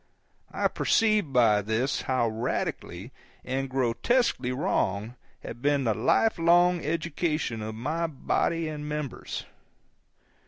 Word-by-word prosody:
I -, -, +1 dB
perceived 215 Hz, -8 st, +2 dB
by 115 Hz, -5 st, +4 dB
this 110 Hz, +6 st, -1 dB
how 130 Hz, -3 st, +1 dB
radically 110 Hz, -2 st, -3 dB, 0.3 s
and 135 Hz, +1 st, -2 dB
grotesquely 130 Hz, -, +1 dB
wrong 110 Hz, -4 st, -1 dB, 0.3 s
had 120 Hz, -, -8 dB
been 145 Hz, 0 st, +2 dB
the 115 Hz, -3 st, +2 dB
life 165 Hz, -, +2 dB
long 175 Hz, +1 st, +4 dB
education 155 Hz, -5 st, -2 dB
of 110 Hz, 0 st, -5 dB
my 155 Hz, +9 st, -2 dB
body 165 Hz, +2 st, -1 dB
and 150 Hz, -1 st, -5 dB
members. 150 Hz, -3 st, -5 dB
135 Hz, 115 wpm, -27 LUFS, 115-165 Hz, 0.3 s, by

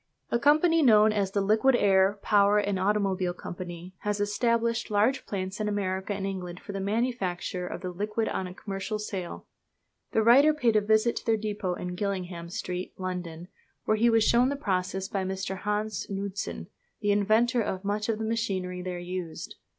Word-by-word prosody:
A 235 Hz, -, +2 dB
company, 310 Hz, +5 st, +4 dB
known 215 Hz, -5 st, +6 dB
as 200 Hz, -2 st, 0 dB
the 200 Hz, +1 st, 0 dB
Liquid 220 Hz, +6 st, +3 dB
Air, 195 Hz, -2 st, +3 dB
Power 205 Hz, 0 st, +4 dB
and 205 Hz, -2 st, 0 dB
Automobile 190 Hz, -2 st, 0 dB
Company, 175 Hz, 0 st, -8 dB
has 210 Hz, 0 st, -2 dB
established 230 Hz, +3 st, 0 dB
large 215 Hz, +6 st, +1 dB
plants 190 Hz, 0 st, -4 dB
in 215 Hz, -, -1 dB
America 190 Hz, -1 st, -2 dB
and 195 Hz, 0 st, -3 dB
England 180 Hz, -2 st, -5 dB
for -, -, -8 dB
the 195 Hz, -, -4 dB
manufacture 195 Hz, -4 st, -2 dB
of -, -, -6 dB
the 185 Hz, -1 st, -4 dB
liquid 210 Hz, +4 st, -2 dB
on 190 Hz, -, -2 dB
a 180 Hz, -, -8 dB
commercial 195 Hz, +2 st, -4 dB
scale. 195 Hz, -4 st, -5 dB, 0.7 s
The 220 Hz, -, +2 dB
writer 280 Hz, +7 st, +6 dB
paid 240 Hz, -7 st, +2 dB
a 215 Hz, -, +5 dB
visit 220 Hz, +3 st, +2 dB
to -, -, -5 dB
their 225 Hz, -1 st, +3 dB
depot 205 Hz, -4 st, -3 dB
in 180 Hz, 0 st, -5 dB
Gillingham 180 Hz, -3 st, -4 dB
Street, 180 Hz, -2 st, -5 dB
London, 180 Hz, -2 st, -5 dB, 0.4 s
where 215 Hz, -, +3 dB
he 230 Hz, +2 st, +3 dB
was 225 Hz, -1 st, +4 dB
shown 240 Hz, +3 st, +4 dB
the 285 Hz, -, -1 dB
process 190 Hz, -6 st, -2 dB
by 195 Hz, -1 st, -2 dB
Mr. 190 Hz, 0 st, -3 dB
Hans 210 Hz, +1 st, -2 dB
Knudsen, 195 Hz, 0 st, -4 dB, 0.4 s
the 205 Hz, -1 st, +2 dB
inventor 220 Hz, +4 st, +3 dB
of 190 Hz, -3 st, -3 dB
much 210 Hz, +2 st, -1 dB
of 220 Hz, -, +1 dB
the 220 Hz, -, -3 dB
machinery 190 Hz, -5 st, -2 dB
there 180 Hz, 0 st, -4 dB
used. 175 Hz, -2 st, -6 dB
205 Hz, 180 wpm, -28 LUFS, 185-220 Hz, 0.7 s, known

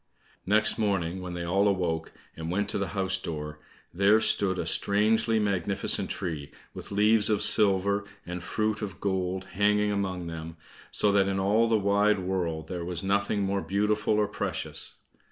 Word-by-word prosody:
Next 110 Hz, +3 st, +3 dB
morning, 95 Hz, -4 st, -1 dB
when 90 Hz, -1 st, -6 dB
they 85 Hz, -, -4 dB
all 95 Hz, +4 st, +2 dB
awoke, 90 Hz, -5 st, -1 dB, 0.2 s
and 80 Hz, 0 st, -6 dB
went 100 Hz, +3 st, -1 dB
to -, -, -1 dB
the 100 Hz, -, -1 dB
house 95 Hz, -1 st, +1 dB
door, 75 Hz, -3 st, -6 dB, 0.3 s
there 100 Hz, +4 st, +4 dB
stood 100 Hz, -4 st, +2 dB
a -, -, -2 dB
strangely 110 Hz, +2 st, +2 dB
magnificent 100 Hz, -2 st, 0 dB
tree 80 Hz, -6 st, -4 dB, 0.2 s
with -, -, -9 dB
leaves 105 Hz, +1 st, +3 dB
of 105 Hz, -2 st, +3 dB
silver, 100 Hz, -1 st, +3 dB, 0.2 s
and 90 Hz, 0 st, -5 dB
fruit 110 Hz, +2 st, -2 dB
of 95 Hz, -4 st, -6 dB
gold 95 Hz, -1 st, -2 dB
hanging 105 Hz, +1 st, +2 dB
among 95 Hz, -3 st, -2 dB
them, 80 Hz, 0 st, -7 dB, 0.3 s
so 105 Hz, -, +2 dB
that 100 Hz, -1 st, +3 dB
in 95 Hz, 0 st, -1 dB
all 105 Hz, +4 st, +3 dB
the 115 Hz, -1 st, +3 dB
wide 100 Hz, +1 st, +2 dB
world 90 Hz, -4 st, -3 dB
there 90 Hz, -1 st, -5 dB
was 85 Hz, 0 st, -3 dB
nothing 100 Hz, +1 st, 0 dB
more 100 Hz, 0 st, -1 dB
beautiful 105 Hz, +2 st, 0 dB
or 105 Hz, -1 st, +2 dB
precious. -, -, -4 dB
100 Hz, 170 wpm, -27 LUFS, 90-105 Hz, 0.3 s, there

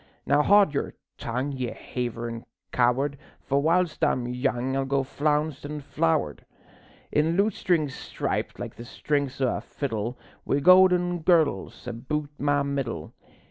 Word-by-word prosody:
"_ -, -, -29 dB, 0.2 s
Now 145 Hz, +1 st, +4 dB
haud 200 Hz, -1 st, +5 dB
your 140 Hz, -, -2 dB, 0.2 s
tongue, 130 Hz, +2 st, -2 dB
ye 130 Hz, -3 st, -3 dB
haverin' 115 Hz, -2 st, -5 dB, 0.3 s
coward, 135 Hz, +3 st, +1 dB, 0.2 s
For 140 Hz, +1 st, 0 dB
whilst 170 Hz, +2 st, +1 dB
I'm 120 Hz, -1 st, +2 dB
young 125 Hz, +1 st, -1 dB
I'll 135 Hz, -, +1 dB
go 135 Hz, 0 st, 0 dB
flounced 150 Hz, +1 st, -1 dB
an' 150 Hz, +1 st, -5 dB
flowered, 155 Hz, -, 0 dB, 0.7 s
In 160 Hz, +3 st, +2 dB
lutestring 185 Hz, -6 st, +2 dB
striped 130 Hz, -, -4 dB
like -, -, -6 dB
the 120 Hz, -, -8 dB
strings 140 Hz, +1 st, -2 dB
o' 130 Hz, -, +1 dB
a -, -, -6 dB
fiddle, 120 Hz, -3 st, -4 dB, 0.3 s
Wi' 140 Hz, -, +1 dB
gowden 180 Hz, +1 st, +5 dB
girdles 155 Hz, -, +1 dB
aboot 140 Hz, +5 st, -4 dB
my 145 Hz, 0 st, +2 dB
middle. 135 Hz, -, -3 dB
140 Hz, 140 wpm, -26 LUFS, 125-155 Hz, 0.7 s, haud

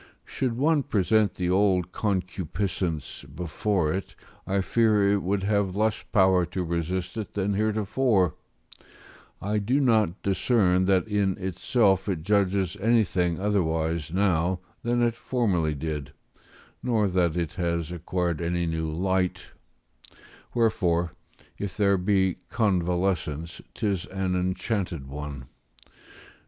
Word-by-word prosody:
Should 125 Hz, -3 st, -2 dB
one 150 Hz, +3 st, +3 dB
present 110 Hz, -3 st, +2 dB
the 90 Hz, -1 st, -1 dB
old 95 Hz, -2 st, +2 dB
concupiscence 95 Hz, -4 st, -2 dB
before 90 Hz, -1 st, -1 dB
it, 95 Hz, +1 st, -5 dB, 0.3 s
I 100 Hz, 0 st, +1 dB
fear 105 Hz, -1 st, +3 dB
it 100 Hz, -, +1 dB
would 95 Hz, +1 st, -1 dB
have 100 Hz, -2 st, +1 dB
less 110 Hz, +1 st, +1 dB
power 95 Hz, -4 st, +4 dB
to 90 Hz, +2 st, -3 dB
resist 90 Hz, +3 st, -2 dB
it 110 Hz, -, -5 dB
than 100 Hz, 0 st, 0 dB
heretofore; 105 Hz, -, +1 dB, 1.1 s
I 105 Hz, +2 st, -1 dB
do 120 Hz, +7 st, +1 dB
not 110 Hz, -, +2 dB
discern 95 Hz, -2 st, +2 dB
that 95 Hz, +1 st, +2 dB
in 100 Hz, -3 st, +1 dB
itself 95 Hz, +1 st, +1 dB
it 85 Hz, -5 st, -2 dB
judges 100 Hz, -2 st, +1 dB
anything 95 Hz, -6 st, +2 dB
otherwise 80 Hz, -6 st, 0 dB
now 90 Hz, -1 st, +1 dB, 0.2 s
than 120 Hz, -1 st, +1 dB
it 120 Hz, -1 st, +2 dB
formerly 95 Hz, -, 0 dB
did, 75 Hz, -2 st, -4 dB, 0.7 s
nor 115 Hz, -4 st, +1 dB
that 90 Hz, -3 st, +1 dB
it 85 Hz, -3 st, -1 dB
has 85 Hz, -1 st, -1 dB
acquired 85 Hz, -1 st, -2 dB
any 85 Hz, +1 st, 0 dB
new 80 Hz, -1 st, -2 dB
light: 90 Hz, +3 st, -1 dB, 1.0 s
wherefore, 90 Hz, -8 st, +1 dB, 0.5 s
if 100 Hz, -2 st, -4 dB
there 100 Hz, -2 st, +3 dB
be 95 Hz, -1 st, +2 dB
convalescence, 90 Hz, -, 0 dB
'tis 100 Hz, -5 st, -1 dB
an 95 Hz, -1 st, -2 dB
enchanted 90 Hz, -, -2 dB
one. 70 Hz, -1 st, -7 dB
95 Hz, 120 wpm, -26 LUFS, 85-105 Hz, 1.1 s, power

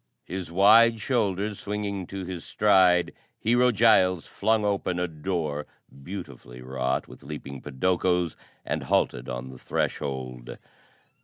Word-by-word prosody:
His 90 Hz, -2 st, -6 dB
wide 110 Hz, +5 st, +6 dB
shoulders 105 Hz, -4 st, -1 dB
swinging 100 Hz, -3 st, -4 dB
to 95 Hz, -1 st, -6 dB
his 90 Hz, -2 st, -6 dB
stride, 95 Hz, -4 st, +3 dB, 0.3 s
Hero 120 Hz, +3 st, +3 dB
Giles 95 Hz, -6 st, +4 dB
flung 110 Hz, -1 st, 0 dB
open 100 Hz, -3 st, 0 dB
a 90 Hz, 0 st, 0 dB
door, 80 Hz, -2 st, -3 dB, 0.3 s
beautifully 70 Hz, -8 st, -9 dB
wrought 65 Hz, 0 st, -2 dB
with -, -, -13 dB
leaping 70 Hz, -2 st, -8 dB
podokos, 90 Hz, +4 st, 0 dB, 0.3 s
and -, -, -2 dB
halted -, -, 0 dB
on 60 Hz, +1 st, -5 dB
the 65 Hz, -, -12 dB
threshold. 65 Hz, -3 st, -3 dB
90 Hz, 125 wpm, -26 LUFS, 70-100 Hz, 0.3 s, wide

